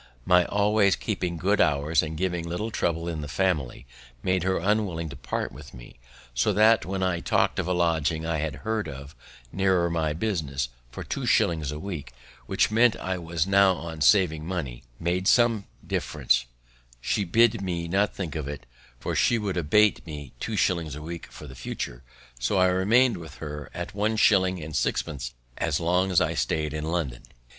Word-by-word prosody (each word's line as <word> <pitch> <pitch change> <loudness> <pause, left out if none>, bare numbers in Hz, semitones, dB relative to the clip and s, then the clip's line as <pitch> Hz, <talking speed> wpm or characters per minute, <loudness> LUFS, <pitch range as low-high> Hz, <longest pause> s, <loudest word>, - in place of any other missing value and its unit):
My 90 -1 +5
always 105 -1 +3
keeping 90 -5 -3
good 100 +5 +2
hours, 75 +1 +2
and 80 0 -5
giving 90 -1 -2
little 105 +7 -3
trouble 85 -5 -1
in 80 -3 -3
the 75 - -5
family, 75 -6 -1 0.4
made 95 -1 +1
her 95 +2 +1
unwilling 95 -4 0
to 70 - -8
part - - -3
with 75 -3 -12
me, - - -13 0.3
so 60 - +2
that, 110 +2 +4
when 95 0 -2
I 90 -2 0
talk'd - - +1
of - - -1
a 90 - +1
lodging 80 -2 +1
I 80 -2 -1
had 75 -2 -2
heard 110 -1 -1
of, 70 +2 -9 0.4
nearer 95 -3 +2
my 80 -2 0
business, 75 - -2 0.2
for 60 - -7
two - - -4
shillings 80 -4 +2
a 75 - -5
week, 75 -8 -6 0.3
which, - - +2
intent 115 +1 +4
as - - -11
I 95 - -1 0.4
now 100 -1 +5
was 85 -1 -6
on 80 - -9
saving 80 -2 +4
money, 80 -9 -4 0.2
made 90 +2 -1
some 115 -4 +3 0.2
difference, - - 0 0.5
she 100 - 0
bid 115 +4 +3
me 85 -3 -3
not 100 +4 +1
think 85 -7 -4
of 75 -3 -3
it, 70 -1 -6 0.3
for - - -3
she 120 - +3
would 105 -4 -2
abate 100 +6 +3
me 75 -4 -8
two - - -3
shillings 85 -5 0
a 75 - -8
week 85 +1 -7
for - - -10
the - - -10
future; - - -5 0.4
so - - 0
I 95 - +5
remained 115 +7 +3
with 80 -3 -10
her 75 -2 -7
at - - -6
one 105 +2 0
shilling 95 -5 +3
and 75 -1 -7
sixpence 65 -6 -2 0.2
as 80 -3 0
long 90 +3 +1
as 90 - +4
I - - +1
staid 75 -2 -1
in 75 0 -3
London. 80 -8 -2
85 Hz, 190 wpm, -26 LUFS, 75-95 Hz, 0.5 s, My